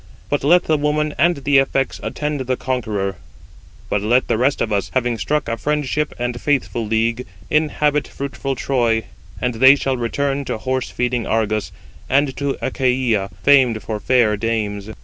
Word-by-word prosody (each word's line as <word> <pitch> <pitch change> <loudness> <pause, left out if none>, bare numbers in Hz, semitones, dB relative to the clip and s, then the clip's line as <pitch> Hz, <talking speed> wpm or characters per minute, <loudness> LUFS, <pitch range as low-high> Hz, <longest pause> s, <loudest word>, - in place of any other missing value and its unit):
But 145 - 0
let 175 +5 +5
the 155 -2 +1
woman 150 +1 0
and 170 +3 +4
the 140 0 +5
effects 135 0 0
attend 150 -1 -3
the 130 -1 -1
conqueror; 105 -7 -2 0.7
but 105 - 0
let 120 +5 +2
the - - +1
rest 135 +3 +2
of 110 - -1
us, 100 -1 -1
having 120 -3 0
struck 150 -1 -1
a 115 - -2
friendship 150 +2 -1
and 120 0 -3
faithful 135 -5 0
league, 115 +3 0 0.2
inhabit 150 -1 +1
fruitful 135 -1 -4
Troy, 120 -4 +1 0.4
and 125 -1 -1
they 130 +4 +7
shall 135 -2 -1
return 140 +4 -1
to - - -3
horse 130 +2 -2
feeding 125 -1 -1
Argos, 110 -2 0 0.4
and 135 0 +2
to 140 0 -2
Achaia, 125 -6 0
famed 130 -6 +4
for 110 -2 -4
fair 120 -3 +3
dames." 105 -2 -2
130 Hz, 165 wpm, -20 LUFS, 115-140 Hz, 0.7 s, they